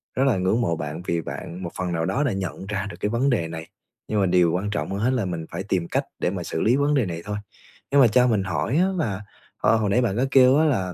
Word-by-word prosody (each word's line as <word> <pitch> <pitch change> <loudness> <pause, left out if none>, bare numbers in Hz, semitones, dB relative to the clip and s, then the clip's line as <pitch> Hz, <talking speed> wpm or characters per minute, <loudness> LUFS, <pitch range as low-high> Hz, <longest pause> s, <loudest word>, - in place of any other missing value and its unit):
rất 130 - +2
là 120 -8 +3
ngưỡng 95 +6 +1
mộ 85 -8 +1
bạn 80 +2 -5
vì 85 -1 0
bạn 90 +3 -7
một 85 - -5
phần 90 -1 -2
nào 80 0 0
đó 100 - 0
đã 135 - +1
nhận 95 0 -4
ra 100 0 -3
được - - -8
cái 105 - -1
vấn 125 +5 +1
đề 105 -10 +1
này, 80 0 -7 0.4
nhưng 105 - 0
mà 100 - +3
điều 90 -2 +3
quan 95 +4 -1
trọng 105 - -2
hơn 100 - -2
hết 115 +5 +2
là 120 -6 0
mình 85 -3 -4
phải 85 +3 -4
tìm 95 -4 -1
cách - - 0 0.2
để - - +1
mà 90 -2 -4
xử 80 - -3
lý 115 +3 +3
vấn 145 +1 +2
đề 130 - +2
này 85 -2 -5
thôi. 105 0 -3 0.5
Nhưng 140 0 +6
mà 125 - +7
cho 125 +3 +4
mình 105 -5 +1
hỏi 95 - -1
á 185 +3 +4
là, 105 - -2 0.4
ờ, - - +3
hồi 105 -2 0
nãy 120 +6 +3
bạn 115 -3 0
có 130 - +2
kêu 130 +1 +6
á 160 - +4
là 95 - 0
100 Hz, 295 wpm, -24 LUFS, 90-125 Hz, 0.5 s, mà